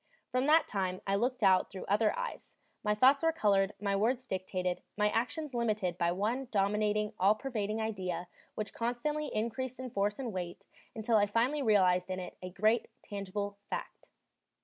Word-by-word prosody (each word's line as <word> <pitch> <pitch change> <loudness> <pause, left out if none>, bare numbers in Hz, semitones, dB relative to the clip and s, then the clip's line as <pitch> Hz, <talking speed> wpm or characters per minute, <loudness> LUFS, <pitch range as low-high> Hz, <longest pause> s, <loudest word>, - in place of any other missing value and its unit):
From 255 +2 +1
that 315 +2 +5
time 185 -2 -2
I 195 - 0
looked 245 +4 0
out 190 -1 +5
through 190 - -7
other 210 +2 +2
eyes, - - -5 0.3
my 210 0 +2
thoughts 265 +5 +5
were 325 0 +3
colored, 200 -9 +2
my 200 0 0
words 240 +5 +1
dictated, 185 -3 -2 0.2
my 210 0 +3
actions 250 +6 -2
limited 215 -7 0
by 170 -1 +2
one 225 +8 -1
dominating, 210 0 +1
all 200 +3 +5
pervading 215 -3 -2
idea 185 -5 -3 0.3
which 215 -1 -4
constantly 270 +6 -1
increased 240 +2 -3
in 255 -2 -5
force 205 0 0
and 245 -5 -4
weight 180 -2 -5 0.3
until 225 0 +2
I 205 -1 +4
finally 245 +8 +1
realized 185 -6 +3
in 185 0 -2
it 180 - -7
a 185 - -5
great, 215 +5 +2 0.2
tangible 200 0 -4
fact. - - -6
210 Hz, 170 wpm, -32 LUFS, 195-240 Hz, 0.3 s, that